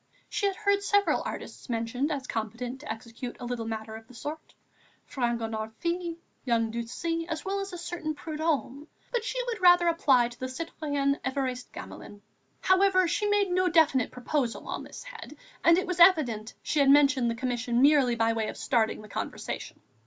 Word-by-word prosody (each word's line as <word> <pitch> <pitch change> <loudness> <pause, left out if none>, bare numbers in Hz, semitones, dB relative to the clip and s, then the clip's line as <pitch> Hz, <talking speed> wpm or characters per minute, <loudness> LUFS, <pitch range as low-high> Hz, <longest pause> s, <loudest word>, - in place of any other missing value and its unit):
She 405 - 0
had 390 - -1
heard 400 -1 +1
several 405 0 +2
artists - - -8
mentioned 235 +5 -1
as 280 -3 -3
competent 240 +3 -4
to - - -6
execute 230 +2 -7
a 245 - -6
little 240 -2 -3
matter 220 0 -5
of 225 0 -11
the 250 - -15
sort, 300 +6 -7 0.5
Fragonard 225 -3 -2
fils, 340 +3 -2 0.3
young 230 -2 +1
Ducis, 330 +9 -3
as 320 -2 -4
well 395 +1 -1
as 390 0 -4
a 355 - -6
certain 335 -3 -4
Prudhomme; 305 -2 -2 0.2
but 480 -2 0
she - - -3
would 465 -4 -4
rather 355 -1 +6
apply 270 -8 +4
to 240 - -14
the 260 - -3
citoyen 285 -1 -2
Évariste 260 -2 -2
Gamelin. 205 0 -10 0.4
However, 375 -1 +4
she 385 +5 0
made 410 -2 +2
no 365 0 +2
definite 310 -7 +4
proposal 250 -1 -2
on - - -4
this - - -10
head - - -10 0.3
and 335 0 +6
it 370 - 0
was 360 -1 -3
evident 265 - +4
she 305 - 0
had 275 -1 +5
mentioned 280 -3 +5
the 230 - -1
commission 245 0 0
merely 280 -4 +5
by 225 0 +2
way 220 -1 -1
of - - -6
starting 220 -3 0
the - - -11
conversation. - - -5
280 Hz, 180 wpm, -28 LUFS, 235-345 Hz, 0.5 s, rather